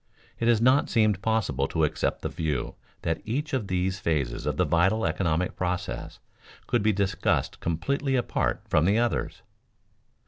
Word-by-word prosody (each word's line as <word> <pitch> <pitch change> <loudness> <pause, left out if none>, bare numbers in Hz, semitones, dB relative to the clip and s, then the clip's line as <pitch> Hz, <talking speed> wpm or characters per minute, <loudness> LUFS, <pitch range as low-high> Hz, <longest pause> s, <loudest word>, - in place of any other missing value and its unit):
It 115 - 0
has 120 -2 +4
not 130 +4 +4
seemed 110 -5 +2
possible 100 - 0
to 80 - 0
accept 75 - -1
the - - -1
view 75 -6 -2 0.3
that 80 -1 -1
each 145 +7 -3
of 120 -7 -1
these 95 +1 -1
phases 70 -7 -1
of - - -1
the - - +3
vital 95 +6 +2
economic 80 +1 0
process 90 -1 -3 0.5
could 120 -3 +1
be 110 +1 +3
discussed 100 -1 0
completely 130 - -1
apart 125 - 0
from 75 - +3
the 100 +4 +3
others. 120 0 -1
95 Hz, 160 wpm, -27 LUFS, 80-115 Hz, 0.5 s, has